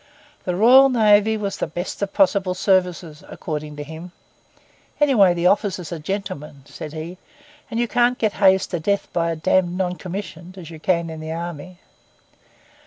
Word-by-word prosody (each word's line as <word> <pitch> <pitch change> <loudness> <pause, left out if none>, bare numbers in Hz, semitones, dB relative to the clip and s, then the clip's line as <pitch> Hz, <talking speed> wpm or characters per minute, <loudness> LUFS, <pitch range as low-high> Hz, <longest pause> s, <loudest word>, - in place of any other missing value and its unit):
The 180 - -1
Royal 255 +7 +7
Navy 220 -2 +4
was 200 -2 -4
the - - -2
best 175 +3 -6
of 200 -1 -2
possible 190 -1 +2
services, 180 -5 0
according 150 -2 -6
to 145 - -6
him. 160 +4 -10 0.9
'Anyway 220 -12 +4
the 170 0 -2
officers 185 -3 +1
are 165 - -5
gentlemen,' 150 -5 -6
said 150 +1 -9
he; 165 +4 -7 0.5
'and 230 -1 -3
you 240 - +1
can't 245 +2 +2
get 215 -2 0
hazed 190 -1 +4
to 175 - -2
death 200 +5 -2
by 170 -1 0
a 165 - -2
damned 180 +2 +1
non 180 -1 -2
commissioned—as 180 -2 -8
you 160 - -10
can 170 0 0
in 160 - -8
the 155 0 -6
army. 170 +1 -6
180 Hz, 170 wpm, -21 LUFS, 165-200 Hz, 0.9 s, Royal